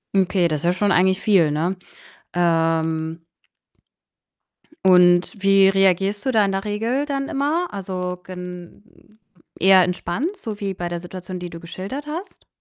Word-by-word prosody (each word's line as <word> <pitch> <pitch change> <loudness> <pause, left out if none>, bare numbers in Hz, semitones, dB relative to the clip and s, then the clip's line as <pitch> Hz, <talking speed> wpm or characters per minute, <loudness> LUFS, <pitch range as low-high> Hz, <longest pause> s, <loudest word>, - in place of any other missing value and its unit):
Okay, 185 -2 +2
das 155 +2 -2
ist 175 +1 +2
schon 205 0 +1
eigentlich 190 +1 +3
viel, 185 -8 +3
ne? 170 +5 -1 0.6
Ähm 165 -1 0 1.6
und 180 +1 +4
wie 195 -1 +5
reagierst 195 +2 +1
du 260 - +1
da 215 -3 +3
in 195 - -1
der 195 - -2
Regel 230 +7 -1
dann 275 -1 -3
immer? 310 +6 -1
Also 180 -2 -4
gen 180 +4 -11 0.4
eher 190 0 +6
entspannt, 190 - -2
so 215 -3 -6
wie 195 -1 -3
bei 175 -1 -5
der 175 0 -4
Situation, 180 +1 -8
die 175 -1 -7
du 165 - -8
geschildert 195 - -7
hast? 335 +6 -8
185 Hz, 150 wpm, -21 LUFS, 175-205 Hz, 1.6 s, eher